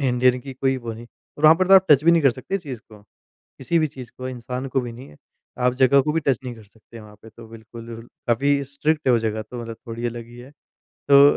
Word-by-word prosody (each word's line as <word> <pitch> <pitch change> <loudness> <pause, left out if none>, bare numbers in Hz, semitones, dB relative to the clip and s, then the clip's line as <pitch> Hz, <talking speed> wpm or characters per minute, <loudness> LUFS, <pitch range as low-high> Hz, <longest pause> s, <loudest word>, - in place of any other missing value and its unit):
इ 135 -2 +1
इंडियन 125 +1 +3
की 135 +2 -9
कोई 135 +1 0
वो 120 -3 -6
नहीं, 115 +2 -10 0.3
वहाँ 155 +1 +7
पर 185 +2 0
तो 195 - +8
आप 190 0 +6
टच 145 0 +6
भी 170 - +6
नहीं 165 -1 +3
कर 135 - +5
सकते 130 +10 -4
चीज़ 135 - -8
को। 105 -1 -15 0.6
किसी 165 +6 0
भी 155 - +2
चीज़ 130 -4 -11
को, 130 0 -5
इंसान 125 +1 -5
को 130 +1 0
भी 120 -2 -6
नहीं 125 +3 -12
है, 75 - -17 0.4
आप 125 0 +1
जगह 130 +2 +4
को 150 +2 -1
भी 165 - 0
टच 135 -6 +1
नहीं 125 -1 -5
कर 110 -2 -15
सकते 110 +2 -16
वहाँ 105 -1 -15
पे 110 - -13
तो 115 +1 -14
बिल्कुल 115 +1 -11 0.2
काफ़ी 140 +4 +2
स्ट्रिक्ट 150 +3 -2
है 130 - +5
वो 120 - +4
जगह 110 -1 -2
तो 120 -1 -6
मतलब 115 -1 -8
थोड़ी 115 +1 -4
अलग 120 -1 -6
ही 120 +1 -14
है। 125 +2 -12 0.4
तो 140 0 +5
125 Hz, 265 wpm, -22 LUFS, 115-140 Hz, 0.6 s, तो